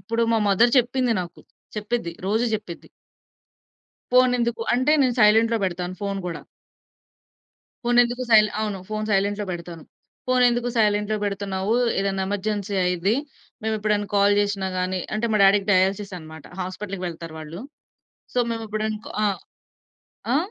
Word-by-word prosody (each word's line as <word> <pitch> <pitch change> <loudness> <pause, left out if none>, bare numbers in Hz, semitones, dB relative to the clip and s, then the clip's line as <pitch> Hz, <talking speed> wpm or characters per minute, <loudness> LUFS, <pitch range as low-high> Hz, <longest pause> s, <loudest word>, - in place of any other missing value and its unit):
ఇప్పుడు 230 +5 -1
మా 225 - +3
మదర్ 235 +5 +4
చెప్పింది 250 0 +1
నాకు. 175 -1 -8 0.4
చెప్పిద్ది, 210 -4 -2
రోజు 220 +4 +1
చెప్పిద్ది. 205 -6 -7 1.3
ఫోనెందుకు? 245 -2 +3
అంటే 255 +4 +2
నేను 255 -2 +2
సైలెంట్‌లో 225 +2 +5
పెడతాను 180 0 -4
ఫోను 200 -1 -2
గూడా. 170 - -5 1.4
ఫోనెందుకు 245 +1 +3
సైల్ 215 -1 +7
అవును. 210 -3 -2
ఫోను 215 0 -2
సైలెంట్‌లో 205 +1 +1
పెడతాను. 170 -2 -7 0.4
ఫోనెందుకు 245 -1 +3
సైలెంట్‌లో 210 0 +2
పెడుతున్నావు? 200 +1 -2 0.3
ఏదన్నా 195 -1 -1
ఎమర్జెన్సీ 205 0 -2
అయ్యిద్ది. 180 +4 +1 0.5
మేమెప్పుడన్నా 215 -1 0
కాల్ 200 0 +4
చేషినా 200 -2 0
గాని 185 0 -1 0.2
అంటే 215 +2 -1
మా - - +3
డ్యాడీ‌కి 195 +1 +4
డయాలిసిస్ 195 +1 +1
అన్నమాట. 160 -1 -12 0.2
హాస్పిటల్‌కి 185 +1 -5
వెళ్తారు 165 -1 -8
వాళ్ళు. 160 +4 -8 0.7
సో 250 - +1
మేము 225 -1 -4
ఎప్పుడన 215 +1 -2
కా - - -8
ఆ! - - +4 1.1
ఆ? - - +5
205 Hz, 130 wpm, -23 LUFS, 190-225 Hz, 1.4 s, సైల్